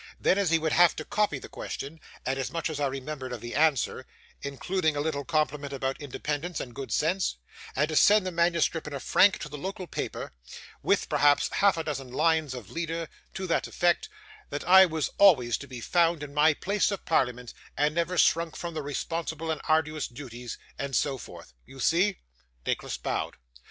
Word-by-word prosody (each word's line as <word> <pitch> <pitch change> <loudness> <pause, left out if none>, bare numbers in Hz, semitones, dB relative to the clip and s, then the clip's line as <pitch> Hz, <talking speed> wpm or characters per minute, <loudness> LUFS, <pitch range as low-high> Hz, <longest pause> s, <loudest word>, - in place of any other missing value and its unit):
Then, 200 +2 +3
he 165 0 +4
would 160 -1 -1
have 175 +1 +5
to 155 - -6
copy 205 -7 0
the - - -9
question, 150 +4 -6 0.3
and 135 +1 -1
as 135 - -2
much 165 -1 -2
as 150 - -4
I 145 - +2
remembered 135 0 -5
of 120 - -4
the 120 +2 -7
answer 150 -3 +1 0.3
(including 155 +3 -1
a - - -1
little 145 -1 -1
compliment 150 -2 -1
about 135 0 -3
independence 150 +4 -3
and 120 - -6
good 135 +2 -7
sense); 170 - +1 0.4
and 150 +3 +2
to 155 - -3
send 205 +4 +6
the 185 - -2
manuscript 170 -2 +1
in 150 - -6
a 140 - -3
frank 195 +8 +4
to - - -4
the 150 0 -8
local 190 +3 -5
paper, - - -5 0.5
with - - +2
perhaps 145 0 +3
half 200 -3 +3
a 165 - -1
dozen 135 -5 -4
lines 155 0 +1
of 120 -6 -9
leader, 165 -1 -3 0.3
to 190 - -3
the 170 - +2
effect, 175 - +1 0.4
that - - -5
I 190 +1 +9
was 160 -3 -2
always 135 - +6
to - - -9
be 125 -2 -8
found 170 +1 +2
in 145 -1 -8
my 150 +1 +4
place 200 +5 +1
in 200 - -1
parliament, 125 -6 0 0.2
and 150 +1 +2
never 170 +2 -1
shrunk 165 0 +3
from 170 -1 -5
the 155 - -3
responsible 160 +2 -3
and 155 - -3
arduous 155 -1 +1
duties, 120 -2 -8 0.2
and 140 -1 -2
so 135 -3 +1
forth. - - -11
You 135 - -14
see?' 180 +8 +2 0.4
Nicholas - - -2
bowed. - - -3
155 Hz, 195 wpm, -28 LUFS, 140-170 Hz, 0.5 s, I